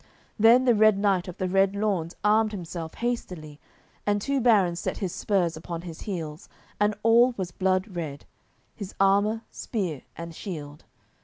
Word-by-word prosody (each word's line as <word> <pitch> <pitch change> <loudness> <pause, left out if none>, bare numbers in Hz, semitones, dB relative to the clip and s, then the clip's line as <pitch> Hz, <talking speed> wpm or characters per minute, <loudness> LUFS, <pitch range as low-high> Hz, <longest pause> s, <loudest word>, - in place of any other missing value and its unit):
Then 235 +4 +6
the 245 - +5
Red 215 -1 +5
Knight 195 -2 +1
of 180 - -8
the 185 - -1
Red 195 +1 +2
Lawns 195 -5 -1
armed 215 +1 +3
himself 170 -3 -6
hastily, 180 -11 -4 0.4
and 205 0 +1
two 275 +5 -1
barons 195 -8 +3
set - - -3
his 190 -4 -3
spurs 180 -5 0
upon 170 +1 -6
his 165 -3 -9
heels, 165 -5 -6 0.3
and 210 0 +2
all 235 +2 +5
was 185 -3 -3
blood 185 +2 0
red, 150 -5 -5 0.5
his 200 -3 -8
armour, 205 +3 +3
spear, 180 - -3 0.2
and 170 0 -7
shield. 155 -5 -8
195 Hz, 160 wpm, -26 LUFS, 170-215 Hz, 0.5 s, Then